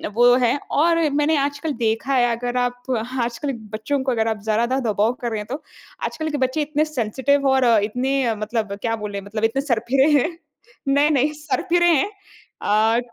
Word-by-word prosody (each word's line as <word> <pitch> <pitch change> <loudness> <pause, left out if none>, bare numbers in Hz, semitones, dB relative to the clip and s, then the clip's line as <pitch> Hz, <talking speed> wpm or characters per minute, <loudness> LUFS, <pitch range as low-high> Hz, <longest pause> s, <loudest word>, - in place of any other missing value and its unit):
वो 245 +1 +6
है 245 +3 +2
और 330 +3 +3
मैंने 295 +2 +2
आजकल 285 +3 -1
देखा 230 +3 0
है 245 -2 +4
अगर 245 +1 -3
आप 245 0 -1 0.4
आजकल 240 +5 -2 0.2
बच्चों 220 +7 -2
को 265 - 0
अगर 225 -2 0
आप 220 -1 -1
ज़रा 220 +2 +1
दा 260 +2 0
दबाव 220 -2 +1
कर 240 - -1
रहे 220 - -2
हैं 210 - -7
तो। 275 +6 -5 0.4
आजकल 315 0 -3
के 295 - -2
बच्चे 260 +3 0
इतने 300 +1 0
सेंसिटिव 275 +1 0
और 265 -1 +3 0.2
इतने 260 +5 0
अ, 230 -2 0
मतलब 215 -1 -3
क्या 225 -1 0
बोले 210 -2 -5
मतलब 210 +2 -5
इतने 225 +5 +1
सरफिरे 265 +1 +2
हैं, 325 - 0 0.6
नहीं-नहीं 285 0 +3
सरफिरे 340 +3 0
हैं। 330 +4 +3 0.5
अ, 220 +3 +3
250 Hz, 185 wpm, -21 LUFS, 225-285 Hz, 0.6 s, वो